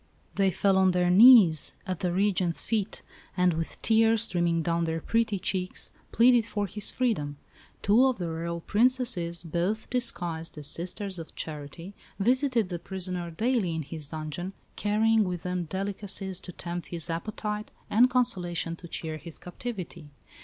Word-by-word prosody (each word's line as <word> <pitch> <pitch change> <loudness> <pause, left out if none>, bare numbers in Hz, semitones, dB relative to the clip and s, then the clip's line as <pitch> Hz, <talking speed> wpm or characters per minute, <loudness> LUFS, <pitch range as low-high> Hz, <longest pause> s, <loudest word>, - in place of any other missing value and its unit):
They 195 -1 +2
fell 190 +1 +2
on 190 0 +5
their 180 0 +3
knees 200 - +7
at 185 -3 -3
the 180 - 0
Regent's 185 -2 +1
feet, 215 -3 -2 0.3
and, 180 -1 +3
with 165 0 -4
tears 225 0 +4
streaming 170 -5 +1
down 170 0 0
their 165 0 -1
pretty 225 +2 0
cheeks, 185 -1 -2 0.2
pleaded 240 0 +5
for 210 -1 -2
his 205 +2 -2
freedom. 150 - -1 0.5
Two 230 +6 +5
of 255 -3 0
the 175 - -3
Royal 170 +1 -4
Princesses, 210 - +1
both 175 +6 -2
disguised 175 -11 -2
as 150 - -5
Sisters 180 +5 -3
of 165 - -10
Charity, 155 +4 -6 0.2
visited 245 -1 +2
the 175 -2 -4
prisoner 180 -1 -4
daily 210 -1 0
in 160 - -2
his 150 0 -7
dungeon, 155 +5 -5 0.2
carrying 220 +1 +3
with 180 -3 -4
them 180 -1 -2
delicacies 190 +1 -3
to 180 - -6
tempt 175 0 -5
his 170 -2 -4
appetite, 210 +4 -4 0.2
and 240 +4 +5
consolation 180 -10 0
to 170 - -11
cheer 160 -1 -4
his 160 +1 -9
captivity. 180 -5 -7
185 Hz, 155 wpm, -28 LUFS, 170-215 Hz, 0.5 s, knees